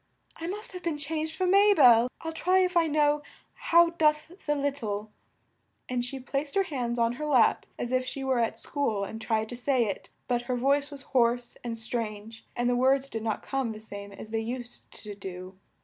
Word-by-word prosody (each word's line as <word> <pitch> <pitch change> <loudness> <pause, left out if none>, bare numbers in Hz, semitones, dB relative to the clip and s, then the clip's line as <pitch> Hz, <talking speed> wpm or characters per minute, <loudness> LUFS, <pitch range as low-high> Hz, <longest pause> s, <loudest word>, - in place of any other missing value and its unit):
I 330 - -6
must 415 +5 -4
have 365 -1 -7
been 335 -4 -2
changed 315 +2 -3
for 370 - 0
Ma 400 +2 +5
bel! 245 -5 +7
I'll 325 - -4
try 365 +3 +2
if 360 0 -1
I 335 -1 +4
know 295 -1 +2 0.3
'How 340 0 +4
doth 305 -1 +2 0.2
the 295 - +2
lit 285 0 -1
tle 210 -3 -4 0.4
'" - - -46
and 250 -1 -1
she 265 +2 -5
placed 275 +2 -3
her 395 - +4
hands 250 -9 -3
on 230 0 +2
her - - -1
lap, 260 -6 +3
as 240 - -4
if 255 0 +2
she 270 +1 -5
were 260 -2 +1
at 230 -1 0
school 225 -9 -1
and 220 +3 -6
tried 220 -1 0
to 245 - -5
say 250 0 +1
it, 200 - -5 0.2
but 245 -1 +1
her 250 - +1
voice 280 +3 +2
was 280 -2 -10
hoarse 240 -1 +2
and 235 -1 -4
strange 225 -1 -4
and 240 0 0
the 245 - +2
words 265 +2 +2
did 225 - -3
not 220 -1 -2
come 265 -4 -2
the 215 - -9
same 200 -2 -8
as 215 +2 -10
they 225 - 0
used 240 +2 -6
to 210 -1 -6
do. 185 -1 -9
255 Hz, 220 wpm, -28 LUFS, 225-300 Hz, 0.4 s, bel